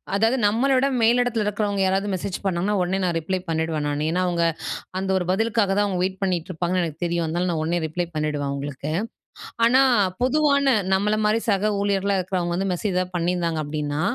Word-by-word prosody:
அதாவது 225 +5 +2
நம்மள 230 +7 +2
விட 265 +2 +3
மேலிடத்தில 235 -1 +2
இருக்கிறவங்க 205 -1 -1
யாராவது 195 +2 0
மெசேஜ் 185 0 -3
பண்ணாங்கன்னா, 190 +2 0
உடனே 180 +2 0
நான் 175 -2 0
ரிப்ளை 185 +4 -2
பண்ணிடுவேன் 160 -2 -1
நானு. 145 +1 -1
ஏன்னா 180 +2 0
அவுங்க 170 -1 +1 0.6
அந்த 190 0 -2
ஒரு 185 - 0
பதிலுக்காக 220 +1 +1
தான் 205 +1 +2
அவுங்க 185 -3 -2
வெயிட் 190 +1 -2
பண்ணிக்ட்டு 180 -3 -1
இருப்பாங்கன்னு 180 +2 0
எனக்கு 160 0 -7
தெரியும். 170 -1 -1
அதனால 175 +3 -1
நான் 165 -2 -1
உடனே 170 +2 0
ரிப்ளை 175 +3 -3
பண்ணிடுவேன் 150 -2 -1
அவுங்களுக்கு. 140 +1 -4 0.8
ஆனா, 260 +3 +5 0.4
பொதுவான 280 +1 +3 0.3
நம்மள 210 +2 +1
மாரி 220 +2 +1
சக 205 +1 +2
ஊழியர்களா 200 0 +1
இருக்கிறவங்க 180 -2 -2
வந்து 195 +1 -1
மெசேஜ் 185 +2 -2
ஏதாவது 185 0 -1
பண்ணியிருந்தாங்க 170 -2 -1
அப்படின்னா, 145 0 -3
185 Hz, 180 wpm, -23 LUFS, 165-205 Hz, 0.8 s, ஆனா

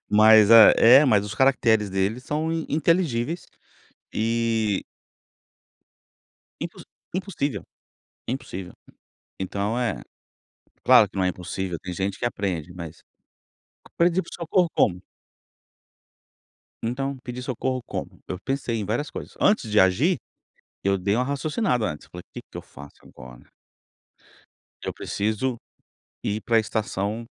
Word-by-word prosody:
Mas 110 0 +7
é 115 +4 +8
mas 105 -7 +3
os 105 +1 -6
caracteres 115 -4 +3
dele 95 +4 0
são 150 +5 -2 0.2
inteligíveis 160 -2 0 0.7
e 115 -2 0 1.8
impo - - -6 0.4
impossível, 150 - -2 0.7
é 120 - 0
impossível. 95 -8 -7 0.7
Então 100 +4 -2
é, 120 -5 -1 0.8
claro - - +7
que - - -15
não 95 - +1
é - - +2
impossível, 90 0 -5
tem 90 -1 -5
gente 95 +2 -3
que 120 - -1
aprende 90 -7 -3
mas, 85 -2 -9 0.8
aprendi 175 +2 +1
por - - -14
socorro 175 +1 +1
como? 90 -2 +2 1.8
Então 135 +4 -2
pedi 125 0 -6
socorro 130 0 -2
como? - - -7
Eu 90 - -5
pensei 135 +1 -2
em 105 - -2
várias 120 +9 -2
coisas, - - -8
antes 205 - +2
de 105 - +3
agir, 115 - +3 0.6
eu 100 0 +2
dei 100 +2 0
uma 125 +3 +1
raciocinada 140 - -1
antes, 75 - -6
falei 90 - -9
que - - -7
que - - -10
eu - - -6
faço 70 +1 -14
agora? 60 -1 -14 1.4
Eu - - -3
preciso 110 +5 -2 0.7
ir 105 +1 -2
pra 115 +3 +3
estação 110 0 -3
110 Hz, 125 wpm, -24 LUFS, 100-135 Hz, 1.8 s, é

